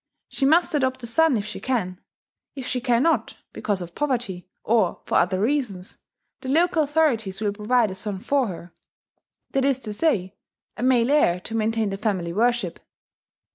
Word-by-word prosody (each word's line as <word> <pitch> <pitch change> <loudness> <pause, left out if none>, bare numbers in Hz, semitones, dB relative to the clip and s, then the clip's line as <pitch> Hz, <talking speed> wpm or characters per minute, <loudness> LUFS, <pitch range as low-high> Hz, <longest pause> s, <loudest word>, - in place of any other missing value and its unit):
She 270 - 0
must 335 +3 +3
adopt 260 -3 0
a - - -3
son 275 +3 +3
if 205 - -3
she - - -6
can: 190 -8 -2 0.5
if 265 -3 -6
she 250 - -2
cannot, 245 +1 +1 0.2
because 200 -4 -2
of 170 0 -10
poverty, 235 -11 -2 0.2
or 215 -6 +1
for - - -6
other 185 +1 +1
reasons, 215 -6 -2 0.4
the 260 - -7
local 330 +3 +3
authorities 280 -11 +1
will 210 -2 -1
provide 215 +1 +1
a - - -4
son 195 +1 -4
for 265 +6 0
her, 175 -2 -8 0.8
that 270 - +1
is 275 -2 +2
to 215 -4 -4
say, 205 - 0 0.4
a - - -7
male 250 0 +3
heir 180 -12 +3
to 225 - -7
maintain 225 -1 0
the 195 - -3
family 185 -6 -1
worship. 230 -3 0
230 Hz, 175 wpm, -24 LUFS, 195-270 Hz, 0.8 s, must